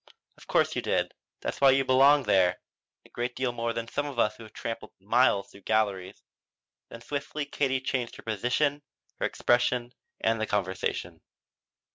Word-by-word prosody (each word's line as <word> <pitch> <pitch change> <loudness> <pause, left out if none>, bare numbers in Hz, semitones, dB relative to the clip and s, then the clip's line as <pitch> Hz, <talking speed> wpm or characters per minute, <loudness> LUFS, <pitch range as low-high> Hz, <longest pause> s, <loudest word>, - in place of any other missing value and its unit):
"Of - - -17
course - - +2
you - - 0
did. - - 0 0.3
That's - - -4
why 135 - +8
you 135 0 +4
belong 135 +2 +6
there. 95 -6 +3 0.5
A - - -18
great 120 +1 -3
deal 130 -1 0
more 115 -1 -2
than 115 0 -4
some 145 +5 -2
of 140 -4 -7
us 105 -2 +2
who've 110 -1 -12
tramped 115 0 -5 0.2
miles 105 0 +2
through 100 - -15
galleries." 100 -3 -1 0.7
Then 115 - -10
swiftly 145 +3 -4
Katie 135 -2 0
changed 130 -2 -2
her - - -12
position, 125 +7 0 0.4
her - - +1
expression 120 0 +1 0.3
and 115 0 +1
the 110 - 0
conversation. 95 -2 -2
120 Hz, 165 wpm, -28 LUFS, 110-135 Hz, 0.7 s, why